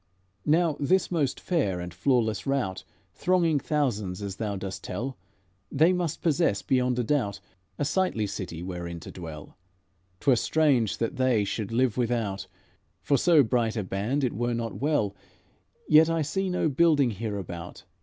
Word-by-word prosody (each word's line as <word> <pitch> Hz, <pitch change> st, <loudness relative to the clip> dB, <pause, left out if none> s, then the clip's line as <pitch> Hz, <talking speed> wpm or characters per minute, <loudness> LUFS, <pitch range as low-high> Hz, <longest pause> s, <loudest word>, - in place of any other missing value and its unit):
"Now 160 Hz, 0 st, +3 dB
this 185 Hz, +7 st, +2 dB
most 150 Hz, -6 st, 0 dB
fair 120 Hz, -, 0 dB
and 90 Hz, 0 st, -6 dB
flawless 110 Hz, 0 st, +1 dB
rout, 95 Hz, -9 st, -1 dB, 0.3 s
Thronging 170 Hz, -, +2 dB
thousands, 110 Hz, -, -1 dB
as 100 Hz, -1 st, -5 dB
thou 105 Hz, -3 st, -2 dB
dost 95 Hz, 0 st, -6 dB
tell, 120 Hz, +8 st, -4 dB, 0.6 s
They 160 Hz, +6 st, +4 dB
must 175 Hz, -3 st, -2 dB
possess, 160 Hz, -, +2 dB
beyond 125 Hz, -1 st, +1 dB
a 125 Hz, -, +1 dB
doubt, 110 Hz, -6 st, 0 dB, 0.4 s
A 145 Hz, -, -1 dB
sightly 155 Hz, -, +1 dB
city 90 Hz, -4 st, -5 dB
wherein 85 Hz, -2 st, -5 dB
to -, -, -9 dB
dwell. 80 Hz, -1 st, -9 dB, 0.6 s
'T 140 Hz, -, +3 dB
were -, -, +6 dB
strange 135 Hz, -7 st, +2 dB
that 115 Hz, -, -2 dB
they 130 Hz, -5 st, +3 dB
should 100 Hz, +1 st, -3 dB
live 125 Hz, 0 st, +1 dB
without; 115 Hz, -5 st, -1 dB, 0.6 s
For 140 Hz, -, +2 dB
so 160 Hz, +1 st, +5 dB
bright 115 Hz, -1 st, 0 dB
a 105 Hz, -, 0 dB
band 105 Hz, +10 st, -1 dB
it 125 Hz, -, 0 dB
were 120 Hz, +2 st, -1 dB
not 115 Hz, +1 st, -4 dB
well; 135 Hz, -9 st, +1 dB, 0.7 s
Yet 155 Hz, +1 st, +6 dB
I 165 Hz, -1 st, +1 dB
see 190 Hz, +6 st, -1 dB
no 180 Hz, -2 st, +1 dB
building 145 Hz, -3 st, +3 dB
hereabout. 100 Hz, -5 st, -6 dB
120 Hz, 160 wpm, -27 LUFS, 100-150 Hz, 0.7 s, were